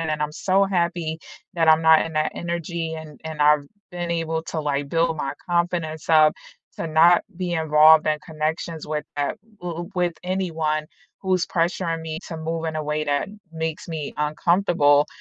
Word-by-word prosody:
and 155 -2 -1
I'm 150 0 -2
so 195 +4 +2
happy 170 -4 -1 0.4
that 165 -2 +2
I'm 160 +1 +6
not 160 -1 +6
in 165 - -7
that 155 0 0
energy 170 -1 -3
and 155 -3 -10
and 160 -1 -6
I've 150 -1 +4 0.3
been 175 -1 -4
able 165 -1 -1
to, 165 0 -4
like, 145 -1 -2
build 165 +1 +1
my 140 -2 -3 0.2
confidence 170 -3 -1
up 155 -1 +6 0.4
to - - -3
not 165 +3 +5
be 180 -1 -3
involved 155 0 +6
in 155 0 +1
connections 160 +1 -4
with, 150 0 -3
uh, 145 -1 0 0.3
w 175 -1 -5
with 180 -1 +1
anyone 160 -5 -1 0.4
who's 185 -2 +1
pressuring 170 -1 -1
me 160 -1 -5
to 165 - -5
move 160 +1 -3
in 160 - -3
a 155 - -2
way 150 +1 -1
that 145 -1 0 0.2
makes 160 -1 -4
me 155 -3 -4
uncomfortable, 150 -1 +3
160 Hz, 175 wpm, -23 LUFS, 155-170 Hz, 0.4 s, I'm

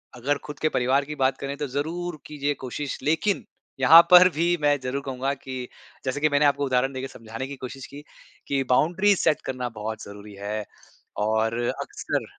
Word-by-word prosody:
अगर 135 +4 0
खुद 150 - -8
के 155 - +1
परिवार 130 +3 +1
की 150 - -6
बात 135 -1 +1
करें 140 0 -4
तो 150 - -3
ज़रूर 160 +4 -3
कीजिए 145 -1 -2
कोशिश 140 +3 -4
लेकिन 165 +7 +1 0.3
यहाँ 150 +6 +9
पर 180 0 +9
भी 170 +2 +2
मैं 145 -1 +3
ज़रूर 130 +2 -2
कहूँगा 135 +1 -2
कि 130 -2 -7 0.4
जैसे 130 +2 -1
कि 155 - +4
मैंने 145 0 +3
आपको 145 0 +2
उदाहरण 130 0 +1
दे 130 - -4
के 135 - -4
समझाने 115 +1 -7
की 140 - -7
कोशिश 130 0 -8
की 145 +1 -11 0.4
कि 135 -1 0
बाउंड्रीज़ 180 +9 +3
सेट 155 - +2
करना 125 -2 -3
बहुत 110 +1 -5
ज़रूरी 100 0 -11
है 105 +1 -4 0.6
और 110 +1 +1 0.2
अक्सर - - -3
140 Hz, 190 wpm, -25 LUFS, 125-150 Hz, 0.6 s, यहाँ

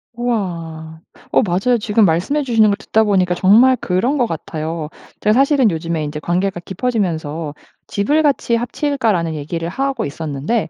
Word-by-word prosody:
우와. 165 -9 -4 0.3
어 - - +4
맞아요. 205 +4 +1
지금 210 -1 +3
말씀해 190 - +1
주시는 225 -4 +3
걸 200 - +2
듣다 220 - +1
보니까 185 -4 +2
정말 215 +8 +5
그런 230 +8 0
것 240 - +2
같아요. 160 -2 -5 0.3
제가 210 - +3
사실은 270 -2 +3
요즘에 165 -1 -2
인제 150 0 -4
관계가 180 +3 -1
깊어지면서 170 - -3 0.3
"집을 285 +11 +1
같이 280 -5 +1
합칠까?"라는 230 - -1
얘기를 165 +3 -4
하고 270 +3 -2
있었는데 155 - -2
195 Hz, 360 characters per minute, -18 LUFS, 165-240 Hz, 0.3 s, 정말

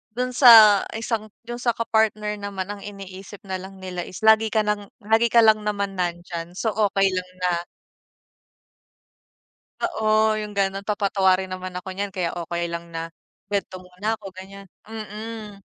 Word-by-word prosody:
dun 250 0 -1
sa 225 -5 +9 0.2
isang 225 -1 -2 0.2
dun 240 +1 -6
sa 240 -1 0
ka-partner 215 -2 0
naman 200 -1 -5
ang 205 - -7
iniisip 195 0 -10
nalang 190 0 -6
nila 185 -2 -6
is 185 +4 -10
lagi 220 0 +6
ka 215 0 +1
ng 210 -1 -2 0.2
lagi 225 +2 +3
ka 235 0 +5
lang 215 -1 +6
naman 200 -1 -1
nandiyan. 175 -1 -4
So, 220 +3 -1
okey 200 -2 +2
lang 185 0 -3
na 180 - +3 2.3
Oo, 220 - -1 0.3
yung 210 0 -6
gano'n, 195 0 0
papatawarin 190 -2 +2
naman 185 0 -5
ako 185 - -15
niyan 200 0 -3
kaya 175 -2 0
okey 170 0 -3
lang 170 0 -4
na 165 0 -4 0.4
kwento 200 -2 -2
muna 180 +3 -8
ako, 210 - -15
ganiyan. 195 +1 -11 0.2
Mm, 215 -1 -8
200 Hz, 150 wpm, -23 LUFS, 185-220 Hz, 2.3 s, sa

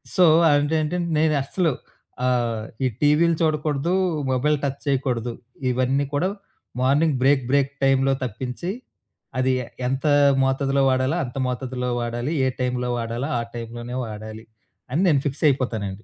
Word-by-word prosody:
So 185 - +6 0.2
అది 145 0 +4 0.2
ఏంటంటే, 160 +4 -1 0.2
నేనస్సలు 155 +1 +1 0.5
ఆహ్, 120 -3 0 0.2
ఈ - - +4
టీవీలు 155 +3 +4
చూడకూడదు, 155 0 0 0.4
మొబైల్ 145 +4 +2
టచ్ 140 0 -2
చేయకూడదు. 125 -4 0 0.4
ఇవన్నీ 130 +3 +1
కూడా 150 +6 +1 0.5
మార్నింగ్ 145 +3 +3
బ్రేక్ 135 -1 +4
బ్రేక్ 140 0 +2
టైమ్‌లో 135 0 +3
తప్పించి 125 - -4 0.7
అది 130 0 +2
ఎ - - -8 0.2
ఎంత 135 +1 -2 0.4
మోతాదులో 135 +1 +1
వాడాలో, 130 +3 +1
అంత 125 0 -7
మోతాదులో 125 0 -3
వాడాలి. 120 +4 -3
ఏ - - +3
టైంలో 125 -1 -1
వాడాలో 115 +3 -3
ఆ - - -1
టైంలో 120 +1 -6
వాడాలి 110 0 -8 0.5
అని 155 +7 +1
నేను 145 -5 +4
ఫిక్స్ 145 +2 -3
అయిపోతానండి. 110 -7 -1
130 Hz, 135 wpm, -23 LUFS, 125-145 Hz, 0.7 s, So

